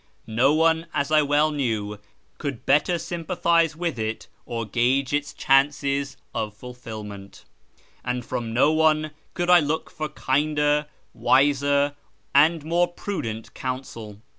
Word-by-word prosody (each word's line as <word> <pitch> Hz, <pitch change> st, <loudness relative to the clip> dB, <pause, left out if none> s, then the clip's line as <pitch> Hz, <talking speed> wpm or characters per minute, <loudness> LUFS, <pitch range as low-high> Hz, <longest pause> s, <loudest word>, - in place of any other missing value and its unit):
No 120 Hz, +5 st, +2 dB
one, 160 Hz, +1 st, +2 dB
as 140 Hz, 0 st, 0 dB
I 155 Hz, -1 st, +5 dB
well 145 Hz, +1 st, +2 dB
knew, 110 Hz, -8 st, -2 dB, 0.4 s
could 140 Hz, -5 st, -5 dB
better 150 Hz, +5 st, +3 dB
sympathise 170 Hz, -1 st, 0 dB
with 165 Hz, -6 st, -3 dB
it 110 Hz, 0 st, -3 dB, 0.2 s
or 115 Hz, -2 st, -3 dB
gauge 125 Hz, +5 st, +1 dB
its 145 Hz, 0 st, -1 dB
chances 140 Hz, 0 st, +1 dB, 0.2 s
of 105 Hz, -1 st, -3 dB
fulfilment, 110 Hz, -5 st, -9 dB, 0.6 s
and 125 Hz, -1 st, -3 dB
from 115 Hz, -2 st, -4 dB
no 130 Hz, +6 st, +4 dB
one 155 Hz, -1 st, +2 dB, 0.2 s
could 175 Hz, -1 st, +1 dB
I 180 Hz, -, +8 dB
look 155 Hz, +1 st, -2 dB
for 155 Hz, -1 st, -4 dB
kinder, 150 Hz, +2 st, +1 dB, 0.3 s
wiser, 145 Hz, 0 st, +3 dB, 0.4 s
and 155 Hz, +2 st, +4 dB
more 175 Hz, +2 st, +2 dB
prudent 115 Hz, -, -5 dB
counsel. 115 Hz, -5 st, -6 dB
140 Hz, 130 wpm, -24 LUFS, 120-155 Hz, 0.6 s, I